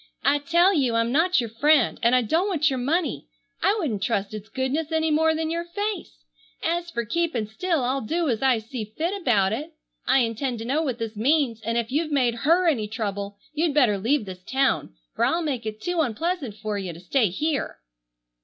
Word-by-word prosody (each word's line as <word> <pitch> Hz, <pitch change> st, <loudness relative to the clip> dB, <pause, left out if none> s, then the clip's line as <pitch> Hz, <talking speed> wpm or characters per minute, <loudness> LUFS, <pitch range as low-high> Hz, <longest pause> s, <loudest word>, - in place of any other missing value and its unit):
"I 290 Hz, +1 st, +3 dB
tell 340 Hz, +6 st, +3 dB
you 260 Hz, -8 st, +1 dB
I'm 230 Hz, +1 st, +1 dB
not 345 Hz, +6 st, +3 dB
your 230 Hz, -3 st, -3 dB
friend, 280 Hz, +2 st, +3 dB
and 235 Hz, +2 st, +4 dB
I 250 Hz, -, +3 dB
don't 330 Hz, -, +1 dB
want 320 Hz, -6 st, +2 dB
your 260 Hz, -, -1 dB
money. 295 Hz, -, -1 dB, 0.3 s
I 405 Hz, -, +3 dB
wouldn't 255 Hz, -, -2 dB
trust 200 Hz, -1 st, -1 dB
its 215 Hz, 0 st, -7 dB
goodness 265 Hz, +6 st, -2 dB
any 320 Hz, 0 st, +1 dB
more 320 Hz, +1 st, +3 dB
than 320 Hz, 0 st, -2 dB
your 335 Hz, +1 st, -1 dB
face. 380 Hz, -, -5 dB, 0.4 s
As 345 Hz, +1 st, -1 dB
fer 235 Hz, -8 st, -3 dB
keepin' 310 Hz, -3 st, -1 dB
still 310 Hz, -, -1 dB
I'll 260 Hz, +2 st, 0 dB
do 330 Hz, +9 st, -1 dB
as 230 Hz, -5 st, 0 dB
I 265 Hz, -3 st, +4 dB
see 225 Hz, +1 st, -5 dB
fit 335 Hz, +4 st, 0 dB
about 210 Hz, -, +2 dB
it. 305 Hz, +7 st, -5 dB, 0.3 s
I 270 Hz, -, +5 dB
intend 235 Hz, +2 st, -1 dB
to 225 Hz, -, -6 dB
know 280 Hz, +6 st, +1 dB
what 260 Hz, -7 st, -2 dB
this 225 Hz, -2 st, -5 dB
means, 245 Hz, 0 st, +1 dB
and 230 Hz, +2 st, -1 dB
if 235 Hz, 0 st, -1 dB
you've 305 Hz, +3 st, 0 dB
made 255 Hz, -5 st, +2 dB
her 330 Hz, +9 st, +2 dB
any 235 Hz, -10 st, +1 dB
trouble 205 Hz, -2 st, -4 dB, 0.2 s
you'd 310 Hz, -1 st, 0 dB
better 235 Hz, -9 st, +4 dB
leave 235 Hz, +3 st, +1 dB
this 185 Hz, -1 st, -8 dB
town, 265 Hz, -, 0 dB, 0.2 s
for -, -, 0 dB
I'll 335 Hz, +1 st, +2 dB
make 260 Hz, -8 st, -2 dB
it 215 Hz, 0 st, -5 dB
too 350 Hz, +7 st, 0 dB
unpleasant 275 Hz, -, -2 dB
fer 210 Hz, -1 st, -3 dB
you 185 Hz, -3 st, -5 dB
to 165 Hz, -, -11 dB
stay 215 Hz, +5 st, +1 dB
here!" 295 Hz, -, -2 dB
265 Hz, 210 wpm, -24 LUFS, 225-320 Hz, 0.4 s, I